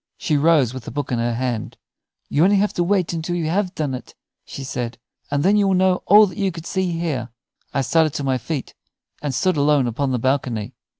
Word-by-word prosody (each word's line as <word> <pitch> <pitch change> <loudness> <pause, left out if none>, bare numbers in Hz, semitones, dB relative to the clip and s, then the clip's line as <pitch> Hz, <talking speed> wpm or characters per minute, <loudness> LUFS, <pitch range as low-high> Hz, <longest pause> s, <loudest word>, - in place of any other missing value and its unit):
She 155 - 0
rose 145 -5 +3
with 130 -3 -8
the - - -5
book 145 -2 -4
in 120 - 0
her 120 0 0
hand. 120 -3 -3 0.5
"You 145 - +1
have 185 +4 +5
only 205 0 +4
to 175 - -2
wait 185 -1 +1
until 170 +1 -2
you 170 -2 -1
have 185 +1 -1
done 145 -4 -2
it," 125 - -8 0.3
she 140 - -8
said, 120 -3 -4 0.3
"and 145 0 0
then 200 +3 +4
you 205 -1 +3
will 190 - +3
know 185 0 +2
all 210 +2 +8
that 200 +2 -7
you 195 -2 +1
could 165 -1 -9
see 185 -1 -1
here." 145 -9 -2 0.4
I 140 - 0
started 155 +3 +2
to 145 - -2
my 130 -2 0
feet 145 +2 -5 0.5
and 145 - -2
stood 180 +7 +1
alone 145 -2 +3
upon 130 +3 -1
the 125 - +1
balcony. 125 -3 -1
150 Hz, 230 wpm, -21 LUFS, 130-180 Hz, 0.5 s, all